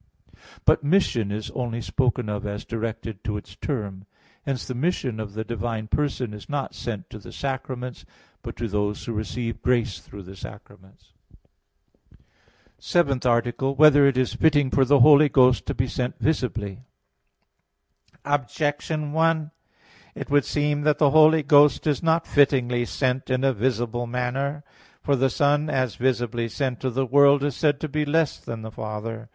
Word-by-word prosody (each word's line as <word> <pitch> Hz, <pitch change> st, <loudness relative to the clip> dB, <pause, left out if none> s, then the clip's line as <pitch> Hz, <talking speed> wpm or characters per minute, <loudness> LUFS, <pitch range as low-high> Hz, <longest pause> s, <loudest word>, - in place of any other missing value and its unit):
But -, -, +4 dB
mission 145 Hz, -, +1 dB
is 105 Hz, +1 st, -5 dB
only 120 Hz, -2 st, -3 dB
spoken 125 Hz, -1 st, -1 dB
of 105 Hz, -1 st, -3 dB
as 105 Hz, 0 st, -5 dB
directed 115 Hz, -2 st, -5 dB
to 105 Hz, -2 st, -3 dB
its 95 Hz, -2 st, -11 dB
term. 100 Hz, -7 st, -5 dB, 0.4 s
Hence 135 Hz, -4 st, -2 dB
the 130 Hz, -, -5 dB
mission 125 Hz, -4 st, -2 dB
of 105 Hz, -2 st, -6 dB
the 110 Hz, -, -3 dB
divine 115 Hz, -1 st, -4 dB
person 130 Hz, -6 st, -1 dB
is 105 Hz, -, -11 dB
not 145 Hz, -2 st, -3 dB
sent 105 Hz, -6 st, -6 dB
to 105 Hz, -, -8 dB
the 100 Hz, -, -12 dB
sacraments, 130 Hz, -2 st, -5 dB, 0.4 s
but -, -, -8 dB
to 115 Hz, -, -3 dB
those 105 Hz, 0 st, -2 dB
who 115 Hz, -, -4 dB
receive 115 Hz, +2 st, -4 dB
grace 120 Hz, -7 st, 0 dB
through 100 Hz, +2 st, -12 dB
the 95 Hz, +2 st, -11 dB
sacraments. 100 Hz, -1 st, -13 dB, 1.0 s
_______________________ -, -, -26 dB, 0.6 s
SEVENTH 140 Hz, -7 st, +1 dB
ARTICLE 120 Hz, +2 st, +1 dB
[I, 135 Hz, -, 0 dB
Q. -, -, -15 dB
43, 155 Hz, +3 st, +6 dB
Art. 150 Hz, -, +8 dB
7] -, -, +6 dB
Whether -, -, +7 dB
It 130 Hz, -, -3 dB
Is 130 Hz, -, 0 dB
Fitting 145 Hz, -4 st, +2 dB
for 135 Hz, -, +3 dB
the 140 Hz, 0 st, +4 dB
Holy 150 Hz, +2 st, +7 dB
Ghost 130 Hz, -2 st, +3 dB
to -, -, -2 dB
Be 125 Hz, -, 0 dB
Sent 125 Hz, 0 st, -3 dB
Visibly? 115 Hz, -10 st, -2 dB, 1.5 s
Objection 145 Hz, +2 st, -2 dB
1: 160 Hz, -1 st, +1 dB, 0.6 s
It -, -, -7 dB
would 145 Hz, -2 st, +3 dB
seem 145 Hz, 0 st, 0 dB
that 150 Hz, 0 st, +2 dB
the 145 Hz, -3 st, +3 dB
Holy 155 Hz, +1 st, +5 dB
Ghost 145 Hz, 0 st, +5 dB
is 150 Hz, -3 st, 0 dB
not 165 Hz, 0 st, +1 dB
fittingly 125 Hz, -4 st, +2 dB
sent 130 Hz, +1 st, -2 dB
in 130 Hz, 0 st, 0 dB
a 135 Hz, -1 st, +3 dB
visible 120 Hz, +1 st, -1 dB
manner. 135 Hz, +4 st, -3 dB, 0.4 s
For 140 Hz, -, +2 dB
the 135 Hz, +1 st, +2 dB
Son 145 Hz, +4 st, +1 dB
as 130 Hz, -5 st, 0 dB
visibly 120 Hz, -2 st, -1 dB
sent 130 Hz, -1 st, -3 dB
to 130 Hz, -, -2 dB
the 130 Hz, +2 st, -1 dB
world 140 Hz, +2 st, +5 dB
is 145 Hz, -3 st, -1 dB
said 145 Hz, -2 st, +1 dB
to 155 Hz, -, -2 dB
be 150 Hz, +1 st, -1 dB
less 155 Hz, +1 st, 0 dB
than 115 Hz, -1 st, -7 dB
the 110 Hz, -, -7 dB
Father. 110 Hz, +2 st, -6 dB
125 Hz, 180 wpm, -24 LUFS, 115-145 Hz, 1.5 s, Art